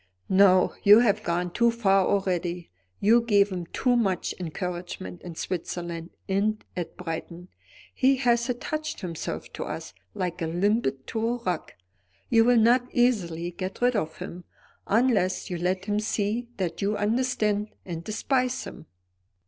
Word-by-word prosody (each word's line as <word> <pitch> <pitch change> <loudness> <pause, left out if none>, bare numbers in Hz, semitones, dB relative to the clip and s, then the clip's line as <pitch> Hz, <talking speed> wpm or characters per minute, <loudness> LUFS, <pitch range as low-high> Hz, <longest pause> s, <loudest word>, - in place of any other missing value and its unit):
"No, 185 -1 +5
you 210 +3 +8
have 215 -4 +2
gone 175 +1 -1
too 235 +5 +3
far 195 -5 +3
already. 180 -3 -1 0.3
You 225 +4 +5
gave 205 -3 +3
him 180 -3 -5
too 250 +6 +1
much 195 -6 0
encouragement 175 +1 -5
in 175 -2 -8
Switzerland, 170 -1 -4 0.2
and 205 +2 0
at 175 -2 -5
Brighton. 175 +1 -6 0.4
He 270 +1 +4
has 240 -2 +1
attached 305 +5 -3
himself 170 -4 -5
to - - -4
us, - - -6 0.2
like 180 -4 -3
a 165 - 0
limpet 175 - 0
to 225 - -3
a 235 - +1
rock. 180 -3 -3 0.6
You 225 0 +6
will 245 0 +5
not 240 +2 +4
easily 175 -9 +1
get 185 +2 -5
rid 245 0 +3
of 160 -7 -2
him; 180 +1 -7 0.4
unless 205 -5 +2
you 175 - -2
let 185 +2 -1
him 210 0 0
see 215 +2 -1
that 175 -4 -3
you 205 +1 0
understand 210 -1 0 0.2
and 170 -2 -5
despise 255 +5 0
him." 160 - -10
200 Hz, 150 wpm, -26 LUFS, 175-230 Hz, 0.6 s, you